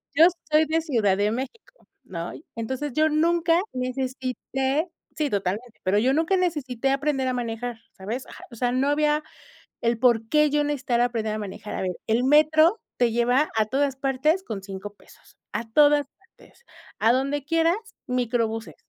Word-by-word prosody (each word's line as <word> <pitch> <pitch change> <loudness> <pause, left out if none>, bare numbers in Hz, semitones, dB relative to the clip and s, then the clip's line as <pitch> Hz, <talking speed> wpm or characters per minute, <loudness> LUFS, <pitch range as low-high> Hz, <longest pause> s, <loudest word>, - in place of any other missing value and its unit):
Yo 320 +3 +8 0.2
soy 305 +1 +4
de 315 +2 +1
Ciudad 220 - +1
de 205 +1 +1
México, 435 - -7 0.2
¿no? 170 -1 -6
Y - - -13
entonces 260 +5 -4
yo 310 +3 +3
nunca 335 +2 +3
necesité, 265 +3 -2 0.3
sí, 300 -2 0
totalmente, 205 +4 -3
pero 190 +2 +2
yo 255 +5 +3
nunca 330 +5 +2
necesité 275 -7 -1
aprender 275 -1 0
a 255 - 0
manejar, 240 -1 -4 0.2
¿sabes? 220 +7 -5
Ajá - - -12
o 235 - -10
sea, 245 +1 0
no 260 +3 +1
había 300 +1 +2 0.6
el 235 0 +1
por 230 -3 +3
qué 300 +2 +3
yo 295 0 +1
necesitara 260 -4 +1
aprender 225 -3 -2
a - - -3
manejar, 210 +1 -6
a - - -3
ver, 185 -1 -1
el 230 +3 +2
metro 310 +7 +5 0.2
te 240 -2 +2
lleva 245 +5 +2
a 220 - +3
todas 275 +2 0
partes 275 +7 +1
con 215 - -5
5 195 +1 -8
pesos, - - -21 0.2
a 230 - -2
todas 290 +2 +5
partes, 390 +5 -23 0.3
a 230 +2 +4
donde 275 +2 -1
quieras, 330 +3 +2 0.3
microbuses. 230 -3 -1
260 Hz, 170 wpm, -25 LUFS, 230-300 Hz, 0.6 s, Yo